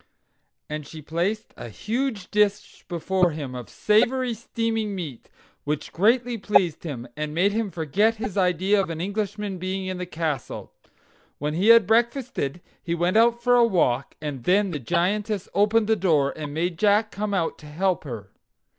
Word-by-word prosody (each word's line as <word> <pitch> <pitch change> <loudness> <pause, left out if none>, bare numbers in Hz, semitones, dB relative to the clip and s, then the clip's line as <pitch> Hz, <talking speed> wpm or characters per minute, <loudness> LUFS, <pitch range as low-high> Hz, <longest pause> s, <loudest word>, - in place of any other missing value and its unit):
And 150 -1 -5
she 160 - -9
placed 170 +8 -2
a - - -8
huge 220 - -3
dish 205 -1 0
before 180 +1 +1
him 150 -5 -5
of 125 -1 -7
savory 240 +4 +2
steaming 225 -2 -2
meat, 155 -10 -7 0.3
which 150 0 -3
greatly 235 +5 +2
pleased 190 -6 +2
him, 125 -7 -5
and 150 0 -4
made 190 +4 +3
him 220 0 -1
forget 190 +7 +1
his 210 -3 -5
idea 190 +2 +2
of 190 - -4
an 165 -1 -4
Englishman 205 0 -3
being 190 +1 -3
in 185 -1 -4
the 180 - -4
castle. 155 -6 -4 0.6
When 150 +1 -2
he 180 +6 +1
had 230 -2 +8
breakfasted 230 - 0 0.2
he 170 -1 -2
went 175 +3 0
out 235 +1 +4
for 245 0 +4
a 240 - +6
walk, 140 - +1
and 145 -5 -5
then 195 - +3
the 150 - -3
Giantess 195 - -1
opened 210 +2 +3
the 220 +1 +3
door, 155 -8 +2
and 150 -2 -6
made 170 +2 -2
Jack 210 +1 +3
come 205 0 -2
out 170 -4 -1
to 150 - -12
help 180 +4 0
her. 115 -9 -7
190 Hz, 170 wpm, -24 LUFS, 160-215 Hz, 0.6 s, had